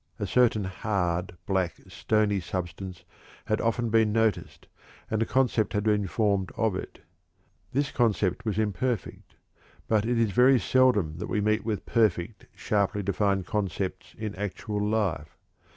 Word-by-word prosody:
A - - -2
certain 120 -4 +3
hard, 90 -2 -2
black, 95 -3 0
stony 105 -2 +1
substance 90 0 -5 0.4
had 110 - 0
often 115 0 0
been 110 -1 +4
noticed, 110 -1 -1 0.4
and 110 0 0
a 115 - +1
concept 125 -5 +1
had 105 -1 0
been 105 -2 +1
formed 100 -2 0
of 110 -4 +1
it. - - -7 0.7
This 140 +1 0
concept 105 -6 +1
was 105 -3 -2
imperfect; 110 +3 -2 0.5
but 110 -2 +2
it 120 +1 0
is 115 -3 +2
very 125 +4 +5
seldom 105 -14 +2
that - - -4
we 105 - 0
meet 110 +1 +1
with 110 -2 -3
perfect, 105 -3 0
sharply 100 0 0
defined 100 -1 0
concepts 95 -2 -3
in 110 -2 -4
actual 105 +1 -4
life. 105 -8 -1
105 Hz, 145 wpm, -27 LUFS, 95-110 Hz, 0.7 s, very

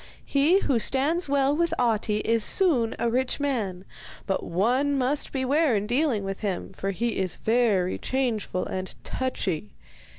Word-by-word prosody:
He 310 +8 +3
who 255 -5 +1
stands 290 +8 +1
well 280 0 +2
with 335 +1 +1
Ahti 220 -3 +1
is 230 -1 +1
soon 275 - +2
a - - 0
rich 255 +4 0
man, 215 -10 -2 0.4
but 195 - -1
one 250 +11 +1
must 270 +3 +1
beware 275 0 +2
in 205 0 0
dealing 245 -2 +1
with 195 0 -4
him, 195 -3 -3
for 195 +1 -4
he 230 +5 -2
is 185 -3 -1
very 220 -6 +1
changeful 235 -8 -1
and 185 0 -5
touchy. 185 - -2
240 Hz, 155 wpm, -26 LUFS, 200-280 Hz, 0.4 s, He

